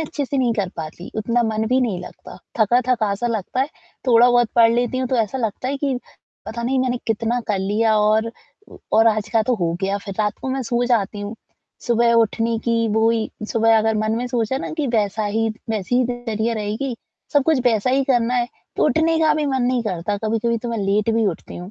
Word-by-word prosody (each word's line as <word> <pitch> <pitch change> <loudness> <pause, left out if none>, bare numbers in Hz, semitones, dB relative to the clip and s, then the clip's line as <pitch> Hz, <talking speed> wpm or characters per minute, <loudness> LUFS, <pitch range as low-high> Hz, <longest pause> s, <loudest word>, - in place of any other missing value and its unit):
अच्छे 295 -2 -3
से 275 +1 -2
नहीं 245 -3 +2
कर 200 -4 -1
पाती, 160 +2 -7
उतना 235 +3 +1
मन 220 -1 -1
भी 255 +1 +3
नहीं 210 -8 -1
लगता, - - -11 0.2
थका-थका 235 -2 +2
सा 240 +4 -3
लगता 230 +2 -2
है, 270 - +2 0.4
थोड़ा-बहुत 240 -1 +5
पढ़ 230 -1 +6
लेती 245 +2 0
हूँ, 255 -1 -1
तो 255 - +1
ऐसा 225 +3 0
लगता 230 +2 -2
है 280 - -1
कि 275 -3 -1 0.5
पता 235 +2 -5
नहीं, 260 +2 0
मैंने 250 -1 0
कितना 230 +2 0
कर 200 -2 +1
लिया 215 +3 +1
और, 215 +2 +2 0.6
और 225 +1 +5
आज 215 -1 +2
का 225 -1 +3
तो 245 +2 +1
हो 170 -5 -1
गया, 200 +1 0
फिर 195 -1 -8
रात 210 -1 0
को 265 - -3
मैं 265 0 -1
सो 240 +1 0
जाती 210 -4 0
हूँ। 205 +2 -5 0.5
सुबह 235 -1 +3
उठने 230 0 +2
की 230 -1 +1
वो 220 +2 +3
ही 225 -1 -1 0.2
सुबह 225 0 +4
अगर 220 0 +1
मन 215 0 0
में 245 +1 -2
सोचा 240 0 -1
है - - -4
ना - - -4
कि 285 - 0
वैसा 215 -2 0
ही 225 +2 0
त 215 - -7 0.2
वैसी 215 +2 -1
ही 255 - +3
दिनचर्या 230 -2 -2
रहेगी, 220 +4 -3 0.4
सब 290 - +4
कुछ 315 -4 +3
वैसा 235 0 +2
ही 270 +1 +2
करना 245 -2 +1
है, 240 -1 +1 0.3
तो - - +2
उठने 320 +1 +2
का 310 -1 +4
भी 300 -2 0
मन 265 -2 0
नहीं 245 -1 +1
करता, 195 +1 -2
कभी-कभी 225 +1 0
तो 240 - -6
मैं 230 - -2
लेट 205 +2 +1
भी 225 -2 +2
उठती 175 - -4
हूँ। 180 +3 -8
230 Hz, 230 wpm, -21 LUFS, 215-245 Hz, 0.6 s, पढ़